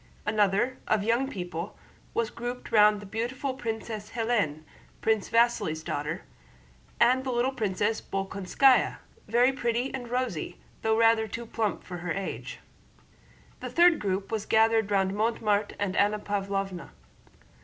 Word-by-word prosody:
Another, 210 +4 +1
of 215 -2 +2
young 235 +5 +1
people, 175 -2 -5 0.4
was 230 -1 0
grouped 245 +1 -6
round 210 -1 +5
the - - -9
beautiful 240 +6 -3
Princess 225 -3 -5
Hélène, 220 -10 0 0.4
Prince 220 -2 +1
Vasíli's 230 -9 +2
daughter, 150 +2 -3 0.8
and 255 +2 +4
the 265 - -3
little 245 +1 +1
Princess 210 -2 -1
Bolkónskaya, 195 +7 +2 0.3
very 245 +5 +4
pretty 240 0 -1
and 255 -3 -5
rosy, 245 -10 -2 0.2
though 220 0 +2
rather 225 -1 +4
too 235 +3 -6
plump 220 -2 -2
for 180 - -7
her 175 -1 -3
age. 195 -1 -5 1.0
The - - -5
third 345 -1 +5
group 195 0 -2
was 220 -2 -2
gathered 220 -1 +3
round 195 -1 +2
Mortemart 210 -1 0
and 200 -2 -2
Anna 210 +1 +3
Pávlovna. 195 -3 -3
220 Hz, 135 wpm, -28 LUFS, 195-235 Hz, 1.0 s, round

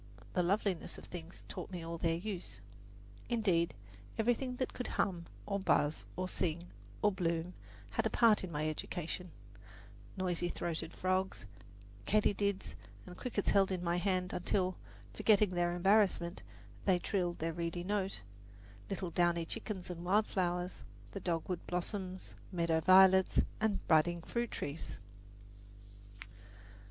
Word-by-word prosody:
"The 180 - +3
loveliness 190 0 0
of - - -10
things 170 0 -8
taught - - -6
me 180 -3 -5
all 165 0 -5
their 165 0 +2
use." 175 - -5 0.7
Indeed, 180 - +2 0.4
everything 245 +3 +1
that 255 0 -2
could 250 - -4
hum, 170 -3 -1 0.2
or 200 -1 -1
buzz, 150 -5 +2
or 185 +1 -2
sing, 175 -1 -2 0.3
or 210 - +5
bloom 170 -2 -1 0.4
had - - +1
a - - -2
part 225 -4 +5
in 185 - -5
my 155 0 -1
education 175 +3 -4 0.9
noisy 175 -2 0
throated 165 -2 -3
frogs, 185 - 0 0.6
katydids 200 -1 +1 0.3
and 180 - -9
crickets 215 -1 -1
held 195 -1 +4
in 180 -1 -2
my 170 0 +1
hand 185 -1 0
until 185 +1 0 0.4
forgetting 210 -2 +4
their 175 -1 +1
embarrassment, 190 -2 +3 0.4
they 190 -2 +5
trilled 175 -2 -1
their 165 +1 -2
reedy 170 +1 -2
note, 195 - -1 0.7
little 185 -2 -3
downy 170 -1 +2
chickens 185 0 -5
and 170 -1 -6
wildflowers, 180 -2 +1 0.3
the 195 - -5
dogwood 175 0 -2
blossoms, 185 +1 -4 0.2
meadow 170 -3 +2
violets 190 +2 +7 0.2
and 215 -2 0
budding 170 +2 +4
fruit 235 +3 -2
trees. 145 +3 -5
180 Hz, 130 wpm, -34 LUFS, 170-195 Hz, 0.9 s, violets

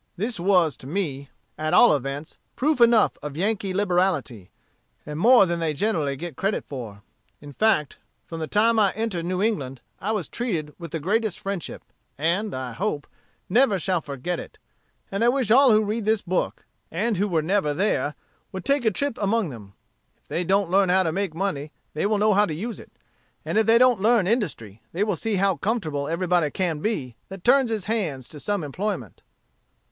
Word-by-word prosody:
This 220 +2 -2
was, 175 -4 +3
to 130 - -11
me, 140 -5 -3 0.3
at 155 +3 0
all 240 - +7
events, 140 +2 -5 0.2
proof 290 -1 +1
enough 235 -2 +4
of 150 0 -6
Yankee 200 +1 0
liberality; 180 - 0 0.6
and 150 +1 -5
more 240 +2 +7
than 170 -1 -2
they 160 -2 -1
generally 155 -6 0
get 165 +1 -7
credit 195 +8 -1
for. 110 -7 -8 0.4
In 145 -1 -11
fact, 200 -7 +1 0.3
from 165 - -7
the 160 - -3
time 225 +4 +3
I 200 -3 +3
entered 205 -6 -3
New 185 +2 -1
England, 140 - -1 0.2
I 205 +5 -2
was 205 -8 -2
treated 170 -12 -3
with 170 -1 -7
the 160 - -4
greatest 210 +5 0
friendship; 195 -4 -5 0.3
and, 180 +8 0
I 130 -1 -4
hope, 155 - -2 0.4
never 230 0 +3
shall 180 -1 0
forget 145 +5 -4
it; - - -10 0.5
and 195 +3 -1
I 240 - +5
wish 250 -4 +1
all 265 +3 +7
who 215 0 +4
read 215 +1 -2
this 215 -1 +1
book, 185 0 -2 0.2
and 210 +5 -1
who 205 +3 +1 0.2
never 190 +1 +1
were 145 - 0
there, 150 -6 0 0.4
would 190 -1 -7
take 280 -2 +1
a - - +6
trip 280 +5 -2
among 205 -2 +1
them. 105 -6 -11 0.4
If - - -39
they 175 - -2
don't 195 0 +1
learn 195 0 +4
how 185 +1 +4
to 165 - 0
make 190 -1 -2
money, 155 -6 -2 0.2
they 155 - 0
will 215 0 +1
know 210 +1 +3
how 205 +1 +4
to 155 - -4
use 225 +8 -5
it; - - -13 0.6
and - - -3
if 220 - +1
they 225 +1 +6
don't 245 -4 +4
learn 225 -2 +4
industry, 160 - -2
they 185 +5 +1
will 210 -3 0
see 220 +5 -2
how 195 -1 +2
comfortable 160 -11 -2
everybody 175 -1 +1
can 170 -2 -2
be 145 - -3
that 190 -1 -9
turns 265 0 +4
his 220 -4 -2
hands 170 - -2
to 150 - -9
some 205 +2 -1
employment." 150 - -4
190 Hz, 195 wpm, -24 LUFS, 155-215 Hz, 0.6 s, all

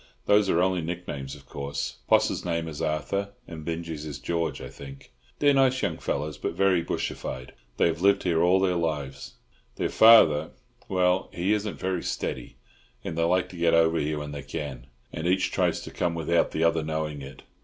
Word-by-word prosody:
Those 105 -1 +4
are 85 0 +3
only 95 -1 +1
nick 85 +2 -5
names, 70 -1 -5
of 70 -2 -15
course. 70 -3 -5
Poss's - - +3
name 85 -1 -2
is 75 -2 -6
Arthur, 100 +6 -2
and 80 -3 -8
Binjie's 80 -2 -4
is 75 -3 -6
George, 80 -1 -2
I - - -7
think. 70 -1 -12 0.3
They're 145 -1 +4
nice 130 -1 +3
young 85 -6 -1
fellows, 75 0 -3
but - - -2
very 95 -3 +3
bushified; 65 -5 -4 0.3
they - - +3
have 85 0 0
lived 100 +1 +4
here 85 -3 +2
all 90 +2 +4
their 95 -1 +2
lives. 75 -5 -3 0.4
Their - - -1
father—well, 90 -2 +4
he 90 +4 0
isn't 105 -1 -2
very 95 -2 -2
steady; - - -4 0.5
and 80 - -4
they 85 - 0
like 90 +2 +2
to 90 - -10
get 85 0 +3
over 80 0 +3
here 75 +1 -1
when 75 0 -5
they 70 -1 -6
can, 70 -3 -6 0.3
and 80 +2 -3
each 95 +1 +1
tries - - +1
to - - -9
come 85 -1 -1
without 85 +1 +1
the 80 - -1
other 85 -1 +3
knowing 75 -1 -3
it. 70 +1 -10
85 Hz, 195 wpm, -26 LUFS, 75-90 Hz, 0.5 s, Those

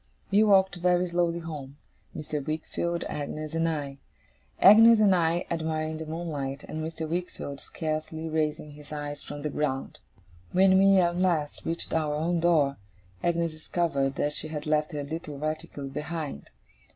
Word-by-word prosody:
We 200 +2 +5
walked 190 -3 +4
very 180 +1 +2
slowly 170 -1 +1
home, 145 -4 -7 0.4
Mr. 150 -1 -4
Wickfield, 165 +3 -2
Agnes, 150 +1 -5
and 165 0 +1
I 140 -3 -4 0.6
Agnes 225 +3 +8
and 205 -3 +5
I 170 0 +1
admiring 160 -1 -2
the 160 - -6
moonlight, 150 -4 -4
and 155 - -4
Mr. 160 0 -4
Wickfield 165 -4 -4
scarcely 160 +1 -4
raising 155 -1 -1
his 145 0 -13
eyes 145 -1 -5
from 145 0 -8
the 150 - -2
ground. 135 -3 -2 0.5
When 190 +1 +5
we, 195 0 +6
at 175 -1 +3
last, 170 -5 0
reached 165 +1 -2
our 155 -2 +1
own 170 +3 0
door, 155 -5 +3 0.4
Agnes 170 -1 +1
discovered 155 -4 -1
that 145 +1 0
she 155 - -2
had 150 -1 -5
left 155 0 +1
her 145 -1 -3
little 150 0 -6
reticule 150 -2 -4
behind. 150 - -5
155 Hz, 155 wpm, -27 LUFS, 150-170 Hz, 0.6 s, Agnes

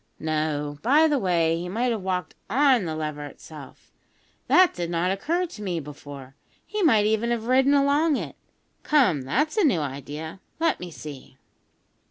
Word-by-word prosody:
No, 150 -2 -2
by 295 +7 +4
the 295 -3 +1
way, 170 -4 +1
he 175 +1 -5
might 240 +6 0
have 220 -3 -2
walked 185 -1 -3 0.2
on 260 -3 +3
the 160 -2 -3
lever 150 -1 -4
itself! 145 -1 -13 0.6
That 365 0 +5
did 175 -1 -4
not 175 +2 0
occur 330 - -1
to 325 -11 -11
me 180 -5 -2
before. 140 -2 -10 0.3
He 425 0 -3
might 225 - +4
even 220 +2 +1
have 235 -2 -1
ridden 265 +3 +4
along 285 +2 +3
it. - - -6 0.5
Come, 245 - +3
that's 295 - -1
a 425 - +4
new 250 - +3
idea. 145 +5 -6 0.2
Let 330 0 +1
me 180 - -7
see." 145 -5 -10
185 Hz, 170 wpm, -25 LUFS, -, 0.6 s, That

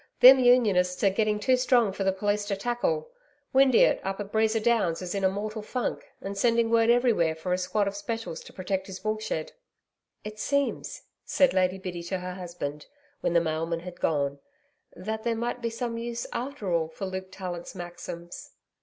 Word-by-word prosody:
Them 260 +2 +10
Unionists 210 -8 +4
are 195 - +5
getting 210 +1 +1
too 255 +5 +3
strong 250 -4 +3
for 195 - -3
the 190 - +3
police 205 +2 0
to 205 -1 -1
tackle. 245 - -1 0.4
Windeatt 265 -2 +5
up 195 +1 -3
at 205 0 -5
Breeza 220 0 +2
Downs 215 -7 +2
is 180 - -4
in 200 -1 -2
a 190 - +5
mortal 210 +3 -4
funk, 245 +4 -3
and 195 +1 -5
sending 230 +2 +2
word 230 0 +4
everywhere 235 -10 +3
for 170 +3 -2
a - - +2
squad 200 +2 0
of 200 - -3
Specials 205 -4 -4
to - - -11
protect 190 0 -3
his 190 0 -8
woolshed.' 215 -6 -2 0.7
'It 215 0 -8
seems,' 280 +2 -1 0.2
said 275 -2 +3
Lady 185 0 +2
Biddy 180 -2 -5
to 180 +3 -3
her 180 0 -5
husband, 170 -5 -6 0.3
when - - 0
the 170 - +6
mailman 165 +1 -2
had 180 0 -9
gone, 140 -2 0 0.6
'that 220 +3 -4
there 235 -1 0
might 240 +2 -3
be 230 - -1
some 230 0 -4
use 235 0 -4
after 245 -7 -3
all 165 -1 +1
for 165 +4 -6
Luke 190 0 -5
Tallant's 180 -2 -6
Maxims.' 175 0 -8
200 Hz, 190 wpm, -27 LUFS, 180-230 Hz, 0.7 s, Them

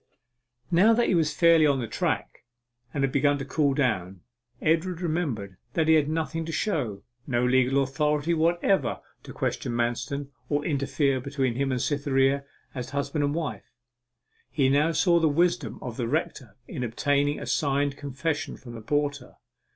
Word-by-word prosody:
Now 195 +7 +5
that 235 +1 +2
he - - +3
was 160 -3 +2
fairly 165 0 +5
on 140 -2 +2
the 120 - -3
track, - - -2 0.5
and 140 - -1
had 135 - +1
begun 145 +1 +2
to 135 - -5
cool 140 0 +1
down, 95 - -1 0.4
Edward 165 +2 +1
remembered 145 - -2 0.2
that 160 -1 +1
he 160 - +6
had 150 -2 +3
nothing 165 +1 -2
to 165 - -5
show 145 - -2 0.2
no 120 -2 +1
legal 130 +2 +3
authority 150 +4 0
whatever 170 +4 +1 0.2
to - - -11
question - - -2
Manston 120 +4 -2 0.2
or 145 0 0
interfere 140 -3 0
between 135 -2 -1
him 135 +2 -1
and 130 - 0
Cytherea 140 0 +1 0.3
as 125 -1 -5
husband 140 +2 -1
and 145 +1 0
wife. 140 - -4 0.8
He 135 -3 +2
now 145 +4 +3
saw 170 +1 +3
the 160 -1 +3
wisdom 160 - +1
of 120 -3 -6
the 120 - -1
rector 140 -6 -3
in 125 - -5
obtaining 145 +5 0
a - - -6
signed 140 -1 0
confession 145 +2 -3
from 120 -2 -11
the 115 - -8
porter. 145 +1 -2
145 Hz, 165 wpm, -26 LUFS, 130-160 Hz, 0.8 s, he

